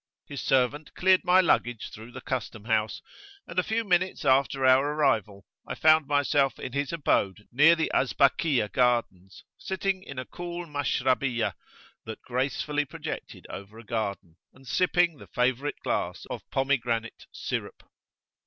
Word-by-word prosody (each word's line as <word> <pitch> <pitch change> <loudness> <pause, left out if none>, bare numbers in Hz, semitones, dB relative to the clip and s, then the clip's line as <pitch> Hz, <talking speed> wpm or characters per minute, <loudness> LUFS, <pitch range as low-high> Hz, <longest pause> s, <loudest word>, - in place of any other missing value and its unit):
His 140 -2 -6
servant 135 +3 0
cleared 185 0 +4
my 180 +1 +5
luggage 120 - 0
through 110 +3 -11
the - - -9
custom 115 -4 -4
house, 110 -2 0 0.4
and 170 - -2
a - - +2
few 225 +3 -1
minutes 185 -2 0
after 135 0 +3
our 130 +1 +6
arrival 110 -9 0 0.2
I - - -4
found 155 -2 +4
myself 145 -1 +2
in 125 - -7
his 140 +1 -1
abode 105 - 0
near 150 +7 +6
the 160 - -1
Azbakiyah 135 - +2
Gardens, 110 -6 0 0.2
sitting 190 0 -2
in 140 -7 -10
a 130 - -4
cool 175 0 -6
Mashrabiyah[FN#8] 130 -5 0 0.5
that 110 -1 -7
gracefully 140 +3 -1
projected - - -7
over 100 +3 -9
a 115 - -11
garden, 100 -6 -4 0.2
and 130 0 -18
sipping 175 +2 +2
the - - -12
favourite 130 +3 0
glass - - -2
of - - -7
pomegranate 120 -4 -1
syrup. - - -5
135 Hz, 145 wpm, -27 LUFS, 115-155 Hz, 0.5 s, our